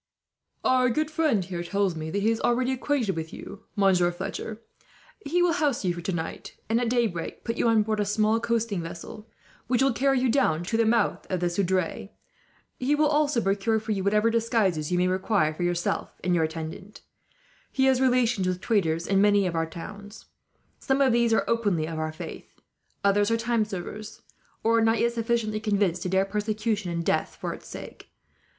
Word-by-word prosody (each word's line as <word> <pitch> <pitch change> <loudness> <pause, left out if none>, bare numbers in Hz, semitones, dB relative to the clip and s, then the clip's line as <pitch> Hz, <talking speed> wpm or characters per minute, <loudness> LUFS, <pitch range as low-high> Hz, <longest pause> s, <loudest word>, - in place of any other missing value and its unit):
"Our 255 -1 +3
good 310 +6 -1
friend 305 - +1
here 175 -2 -4
tells 195 0 0
me 160 0 -5
that 200 +4 -2
he 220 - +3
is 225 - -2
already 250 +2 +1
acquainted 260 -5 0
with 160 0 -5
you, 200 +2 -10
Monsieur 185 -4 +3
Fletcher. 210 +4 -5 0.6
He 350 +5 +1
will 350 -1 +3
house 290 - 0
you 180 - +2
for 175 - -7
tonight, 170 -2 -4
and 230 +2 +1
at 240 - 0
daybreak 225 -9 -1
put 230 - -2
you - - +1
on 225 -2 +4
board 215 0 -1
a 205 - +1
small 215 +2 +2
coasting 230 -5 -1
vessel, 175 +6 -9 0.4
which 250 +1 +2
will 270 -2 +3
carry 270 +2 +2
you 260 - +2
down 225 - +2
to 210 +6 -2
the 225 0 +3
mouth 230 +1 +1
of 185 - -1
the 175 0 0
Seudre. 185 0 -1 0.7
He 270 +4 +2
will 305 +1 +3
also 295 -3 +2
procure 205 +3 +1
for 220 +1 -5
you 195 -3 -1
whatever 210 +3 +3
disguises 220 -9 +1
you 180 - +2
may 180 +1 +2
require, 185 -3 +1
for 155 - -8
yourself 175 0 -1
and 180 - +1
your 165 -2 +3
attendant. 160 +5 -7 0.7
"He 265 - +2
has 265 -1 +3
relations 245 -6 +2
with 180 0 -1
traders 170 -7 0
in 195 0 +2
many 205 -1 +4
of 180 - -1
the 165 0 0
towns. 205 +5 -10 0.5
Some 265 0 0
of 265 -3 +4
these 235 -1 +3
are 225 - +3
openly 205 -9 +1
of 160 -1 -4
our 155 0 -2
faith, 155 - -10 0.4
others 205 +1 +3
are 230 - +2
time 230 -1 +1
servers, 210 +2 -7 0.4
or 230 +1 +3
are - - +2
not 225 +1 +3
yet 235 0 +2
sufficiently 230 -2 -1
convinced 200 -5 0
to 180 - -2
dare 190 +1 +2
persecution 210 0 -2
and 170 -1 -3
death - - 0
for - - -3
its - - -12
sake. - - -10
210 Hz, 200 wpm, -26 LUFS, 180-235 Hz, 0.7 s, on